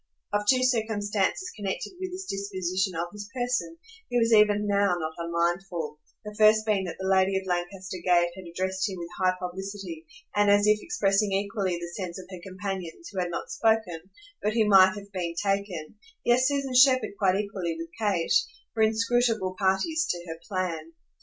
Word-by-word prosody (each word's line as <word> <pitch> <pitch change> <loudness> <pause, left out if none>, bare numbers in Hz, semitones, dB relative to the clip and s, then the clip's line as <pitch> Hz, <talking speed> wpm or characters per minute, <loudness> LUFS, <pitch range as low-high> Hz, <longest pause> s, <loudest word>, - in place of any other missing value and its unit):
Of 205 0 0
two 255 -1 +5
circumstances 220 - 0
connected 200 -3 -4
with 375 -1 -4
this 375 +1 -6
disposition 190 - -2
of 170 +1 -2
his 205 0 -8
person 250 +6 -1 0.3
he 245 - 0
was 230 -1 +3
even 210 -1 +5
now 200 -2 +2
not 160 -2 -3
unmindful; 170 -2 -2 0.3
the 210 - -6
first 215 0 +6
being 205 -3 +1
that 165 - -5
the 190 - -3
lady 190 0 +3
of 190 - -4
Lancaster 185 +1 -3
Gate 175 -1 +3
had 190 -1 -10
addressed 190 +3 -1
him 190 - -6
with 170 -1 -6
high 185 0 +3
publicity 185 -2 -6 0.3
and 205 0 +4
as 205 0 +5
if 210 0 +4
expressing 205 - +1
equally 195 -2 -1
the 170 0 -7
sense 185 -3 -5
of 185 - -9
her 185 -2 -8
companions, 195 - -6
who 190 - -3
had 180 -1 -1
not 170 - -5
spoken, 200 -6 0 0.3
but 210 +1 0
who 220 -2 +3
might 190 -1 +7
have 200 0 -10
been 175 -3 -3
taken 195 -2 -2 0.3
yes, 250 +2 +4
Susan 275 -2 -1
Shepherd 255 -3 +5
quite 190 -2 +3
equally 190 -5 -3
with 165 0 -6
Kate 200 -6 +1 0.4
for 225 - -1
inscrutable 220 -3 +2
parties 205 +13 +1
to - - 0
her 165 0 -6
plan. 170 -4 -3
195 Hz, 180 wpm, -27 LUFS, 180-215 Hz, 0.4 s, might